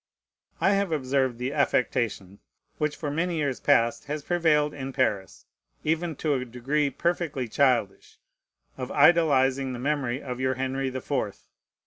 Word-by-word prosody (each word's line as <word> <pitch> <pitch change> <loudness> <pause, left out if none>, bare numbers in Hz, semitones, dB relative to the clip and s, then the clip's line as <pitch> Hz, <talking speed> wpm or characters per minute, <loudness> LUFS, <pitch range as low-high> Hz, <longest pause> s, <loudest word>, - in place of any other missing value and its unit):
I 190 - +3
have 200 -3 +1
observed 130 -4 0
the 125 +3 -3
affectation 115 -8 0 0.4
which 150 -1 0
for 145 -3 -4
many 170 +3 -1
years 145 -5 -1
past 115 0 +2
has 150 0 -4
prevailed 155 -4 +2
in 135 -1 -6
Paris, 105 -8 -1 0.4
even 165 +1 -1
to 150 +1 0
a 130 -2 -1
degree 135 +5 -1
perfectly 155 -3 -2
childish, 120 -5 0 0.6
of 125 - -4
idolizing 140 -4 +4
the - - -5
memory 135 -1 -1
of 125 -3 -6
your 130 0 0
Henry 130 +1 -2
the 130 0 -5
Fourth. 125 -8 -3
135 Hz, 145 wpm, -26 LUFS, 125-150 Hz, 0.6 s, idolizing